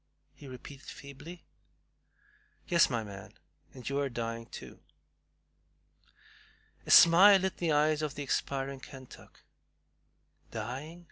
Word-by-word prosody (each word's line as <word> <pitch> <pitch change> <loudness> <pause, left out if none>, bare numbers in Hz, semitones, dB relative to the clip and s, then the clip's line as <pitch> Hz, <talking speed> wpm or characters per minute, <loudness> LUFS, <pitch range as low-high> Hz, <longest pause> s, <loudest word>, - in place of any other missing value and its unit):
he 145 - -14
repeated 135 +2 -11
feebly. 150 +5 -11 1.2
"Yes, 170 -2 +4
my 115 -3 -2
man, 100 -2 -11 0.4
and 125 -3 -11
you 140 +1 -1
are 140 -1 -1
dying 115 -1 -5
too." - - -11 2.1
A - - -7
smile 190 +4 +8
lit 190 0 -2
the 170 -2 -1
eyes 150 +1 +2
of 150 -2 -3
the 145 - -5
expiring 135 0 -3
Kentuck. 130 -1 -14 1.1
"Dying!" 130 +9 -6
140 Hz, 115 wpm, -30 LUFS, 125-155 Hz, 2.1 s, smile